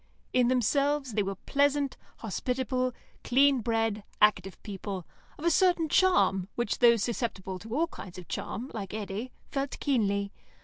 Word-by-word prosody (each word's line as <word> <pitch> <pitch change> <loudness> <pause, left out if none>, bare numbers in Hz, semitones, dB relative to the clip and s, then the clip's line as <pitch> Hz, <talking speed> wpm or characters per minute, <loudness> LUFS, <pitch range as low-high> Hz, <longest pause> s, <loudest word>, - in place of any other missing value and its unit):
In 250 -1 +4
themselves, 270 +2 +1
they 210 - +2
were 195 0 -2
pleasant, 285 +5 +1 0.2
hospitable, 255 +3 -1 0.3
clean 275 +1 +4
bred, 225 -2 0 0.2
active 195 -3 +3
people, 195 -3 -5 0.3
of 300 - -7
a 340 - +4
certain 350 -2 +3
charm, 290 - +3
which 240 -4 -1
those 235 -4 +5
susceptible 195 -6 -3
to 225 +5 -6
all 320 +4 +3
kinds 190 - -10
of 180 - -9
charm, 255 +5 -5
like 205 -2 -5
Eddy, 215 +4 -4 0.2
felt 275 0 -3
keenly. 200 -7 +1
235 Hz, 145 wpm, -29 LUFS, 200-275 Hz, 0.3 s, those